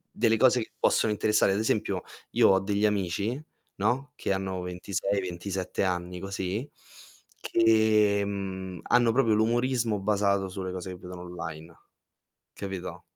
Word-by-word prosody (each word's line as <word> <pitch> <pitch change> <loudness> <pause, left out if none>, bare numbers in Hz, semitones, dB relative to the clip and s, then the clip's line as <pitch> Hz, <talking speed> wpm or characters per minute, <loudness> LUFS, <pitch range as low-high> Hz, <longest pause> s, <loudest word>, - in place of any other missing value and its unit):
delle 115 -2 +3
cose 125 0 +4
che 110 - -7
possono 110 - +3
interessare. 105 -1 +2
Ad 100 - 0
esempio 105 -4 0 0.3
io - - +5
ho 95 - +4
degli 100 +1 0
amici, 105 - 0 0.4
no, 130 +7 0
che - - -2
hanno 95 -1 -3
26, 90 +2 -2
27 95 +1 -3
anni 90 -1 -2 1.2
che, 110 -2 +3
mhmm, 95 -2 -5
hanno 120 -1 +4
proprio 115 -3 +3
l'umorismo 115 0 +1
basato 100 -1 +1
sulle 95 0 -5
cose 95 0 -5
che 90 - -8
vedono 90 0 -9
online. 80 -2 -8 0.8
Capito? 95 -2 -6
100 Hz, 130 wpm, -28 LUFS, 95-110 Hz, 1.2 s, io